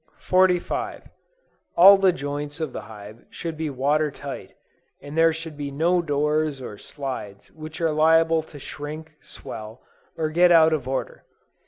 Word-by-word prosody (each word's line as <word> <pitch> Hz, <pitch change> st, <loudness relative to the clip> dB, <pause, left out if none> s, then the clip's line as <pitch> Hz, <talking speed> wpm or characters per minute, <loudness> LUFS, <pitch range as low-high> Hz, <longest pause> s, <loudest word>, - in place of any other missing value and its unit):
45. 185 Hz, -1 st, +1 dB, 0.7 s
All 195 Hz, +3 st, +10 dB
the 190 Hz, -1 st, +5 dB
joints 145 Hz, -1 st, -5 dB
of 155 Hz, -5 st, -3 dB
the -, -, -5 dB
hive 105 Hz, +1 st, -12 dB
should 165 Hz, -2 st, -6 dB
be 155 Hz, 0 st, -3 dB
water 145 Hz, +3 st, +1 dB
tight, 140 Hz, 0 st, -9 dB, 0.4 s
and 145 Hz, +1 st, -10 dB
there 165 Hz, 0 st, +5 dB
should 160 Hz, -1 st, -7 dB
be 145 Hz, -1 st, -5 dB
no 170 Hz, +5 st, +1 dB
doors 150 Hz, -1 st, 0 dB
or 120 Hz, -5 st, -7 dB
slides 130 Hz, -8 st, -7 dB
which 155 Hz, 0 st, -9 dB
are 165 Hz, -2 st, +1 dB
liable 160 Hz, +1 st, +4 dB
to 155 Hz, -1 st, -13 dB
shrink, 150 Hz, +3 st, -8 dB
swell, 110 Hz, +3 st, -10 dB, 0.3 s
or 155 Hz, -1 st, -1 dB
get 175 Hz, +2 st, +5 dB
out 160 Hz, -1 st, +6 dB
of 140 Hz, -5 st, -2 dB
order. 135 Hz, 0 st, -4 dB
155 Hz, 155 wpm, -24 LUFS, 140-165 Hz, 0.7 s, All